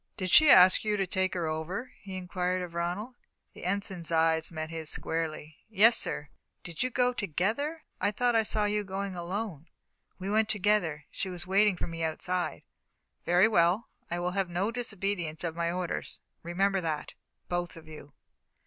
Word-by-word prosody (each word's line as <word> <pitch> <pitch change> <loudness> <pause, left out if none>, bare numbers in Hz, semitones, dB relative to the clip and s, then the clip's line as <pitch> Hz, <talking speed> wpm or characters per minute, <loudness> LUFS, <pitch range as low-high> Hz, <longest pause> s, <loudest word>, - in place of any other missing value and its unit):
"Did 185 -3 -2
she 310 -1 +8
ask 185 -7 +8
you 210 -1 0
to 195 - +1
take 185 +1 -1
her 175 -2 -1
over?" 160 +10 -4
he 190 -2 -7
inquired 180 0 -2
of 175 -1 -8
Ronald. 175 +8 -3 0.4
The - - -10
Ensign's 185 -3 -2
eyes 160 0 +2
met 155 -1 -5
his 160 -2 -4
squarely. 160 -1 -2
"Yes, 225 +2 +6
sir." 145 - 0 0.3
"Did 170 -2 -6
you 255 - +1
go 250 0 +1
together? 230 - -2 0.2
I 200 - +2
thought 240 +3 +1
I 225 - +5
saw 215 -1 +2
you 210 0 0
going 195 0 -4
alone." 175 -2 -4 0.5
"We 190 - -6
went 215 +1 +2
together. 195 -8 +1
She 190 - -3
was 180 -1 -4
waiting 195 +1 +3
for - - -3
me 165 -1 -5
outside." 160 - -2 0.6
"Very 180 +4 +5
well. 185 +1 +2 0.2
I 175 - -2
will 175 +1 -1
have 190 -1 -1
no 185 +5 -1
disobedience 195 -9 -3
of 165 -2 -3
my 170 0 -1
orders 180 -1 -4 0.2
remember 190 +3 0
that, 155 -3 -3 0.3
both 175 -1 -3
of 160 -1 -13
you." 150 -2 -12
185 Hz, 175 wpm, -29 LUFS, 170-205 Hz, 0.6 s, she